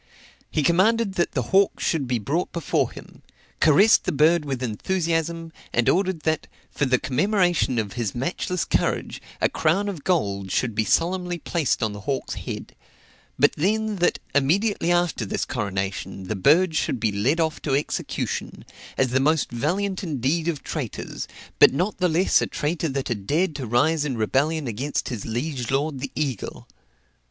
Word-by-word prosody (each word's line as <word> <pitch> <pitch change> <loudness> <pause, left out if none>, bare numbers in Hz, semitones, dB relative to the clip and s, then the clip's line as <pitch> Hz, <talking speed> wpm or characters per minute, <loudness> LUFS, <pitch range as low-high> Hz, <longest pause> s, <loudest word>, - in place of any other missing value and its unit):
He 155 - 0
commanded 195 +6 +3
that 175 -2 0
the 125 -4 -2
hawk 195 0 +4
should 150 -6 0
be 125 -1 +1
brought 145 - -2
before 170 - 0
him; - - -13 0.4
caressed 195 +9 +5
the - - +1
bird 155 +1 +3
with 135 -3 -3
enthusiasm, 165 - -1 0.2
and 120 - +1
ordered 185 -3 +2
that, 160 0 -1 0.2
for 145 - 0
the 130 0 +3
commemoration 175 - +1
of 105 -4 -2
his 115 -5 -3
matchless 170 +6 -2
courage, - - -1 0.2
a - - +3
crown 170 +6 +1
of 180 -8 -5
gold 100 - 0
should 115 +4 0
be 110 +1 0
solemnly 180 - +1
placed 160 -8 -1
on 110 -2 0
the 105 - -7
hawk's 135 +6 -3
head; - - -7 0.6
but - - +5
then 215 +5 0
that, 175 - +2 0.2
immediately 175 +6 +2
after 175 -7 +1
this 100 - -2
coronation, 95 -1 -3
the 95 +4 -3
bird 160 - +4
should 130 - 0
be 110 - +1
led 120 +11 +1
off 160 -1 0
to 135 -3 0
execution, 145 - -3 0.3
as 130 - +2
the 130 +2 +2
most 155 +1 +2
valiant 185 +11 -1
indeed 155 +1 -1
of 160 -5 -2
traitors, - - -5 0.3
but - - +8
not 185 +6 -1
the 180 -1 +3
less 170 +4 +3
a - - 0
traitor 160 +2 -2
that 135 -1 -2
had 105 -5 -4
dared 165 +3 +1
to 130 - -4
rise 145 +7 +2
in 135 -5 -2
rebellion 145 +8 +1
against 125 +5 -2
his 115 -6 -5
liege 125 +1 -3
lord 140 +1 0
the 140 - -5
eagle. 140 -8 -3
150 Hz, 170 wpm, -24 LUFS, 125-175 Hz, 0.6 s, but